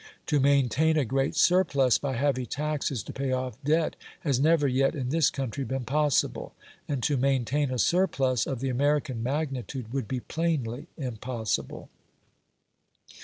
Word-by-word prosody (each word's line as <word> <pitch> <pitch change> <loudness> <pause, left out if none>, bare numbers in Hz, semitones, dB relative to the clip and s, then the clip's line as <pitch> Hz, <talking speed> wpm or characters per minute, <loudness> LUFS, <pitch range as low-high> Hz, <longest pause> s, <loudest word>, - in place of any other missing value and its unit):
To 150 -3 +1
maintain 140 +3 +3
a 145 - +2
great 135 +4 0
surplus 140 -9 +3
by 140 -2 -2
heavy 130 -1 0
taxes 145 -5 -2
to - - -8
pay 135 -1 -2
off 130 -1 -3
debt 155 +3 +1 0.3
has 140 -5 +1
never 155 0 +4
yet 135 +3 +2
in 130 -4 -3
this 160 0 +3
country 135 0 -4
been 135 0 -3
possible, 150 +1 0 0.3
and 140 -5 -2
to 145 - +2
maintain 135 +2 +1
a 130 - -2
surplus 135 - +2
of 130 -3 -3
the 135 - -1
American 140 -1 0
magnitude 130 -3 -3
would 135 -6 -2
be 125 +3 -3
plainly 155 -4 -2
impossible. 125 - -4
135 Hz, 150 wpm, -27 LUFS, 125-150 Hz, 0.3 s, never